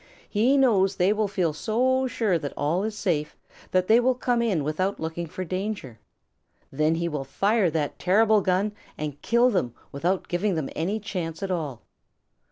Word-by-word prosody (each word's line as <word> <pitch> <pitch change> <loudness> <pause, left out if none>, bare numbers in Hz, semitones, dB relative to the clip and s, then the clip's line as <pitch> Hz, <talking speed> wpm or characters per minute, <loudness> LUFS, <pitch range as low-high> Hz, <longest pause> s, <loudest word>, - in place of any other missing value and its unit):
He 240 +7 +3
knows 200 -8 +3
they 190 +2 +3
will 215 0 0
feel 180 -5 0
so 255 - +1
sure 210 -8 0
that 145 -2 -6
all 165 +6 0
is 215 0 -3
safe 150 -7 -1 0.3
that 185 0 +2
they 220 +4 +5
will 255 +1 +2
come 245 -1 0
in 200 -10 +1
without 185 +7 -1
looking 160 +1 -4
for 185 +3 -5
danger. 185 - -4 0.7
Then 155 +3 +1
he 170 +1 -1
will 150 -4 -3
fire 195 - +1
that 150 -2 -2
terrible 215 +3 +4
gun 190 +3 +1 0.3
and 150 -2 -5
kill 240 +2 +3
them 125 - -1 0.2
without 175 +7 -1
giving 180 +2 0
them 155 -4 -3
any 195 +7 -1
chance 180 -5 -5
at 195 - -2
all. 150 -9 -3
185 Hz, 175 wpm, -25 LUFS, 160-215 Hz, 0.7 s, they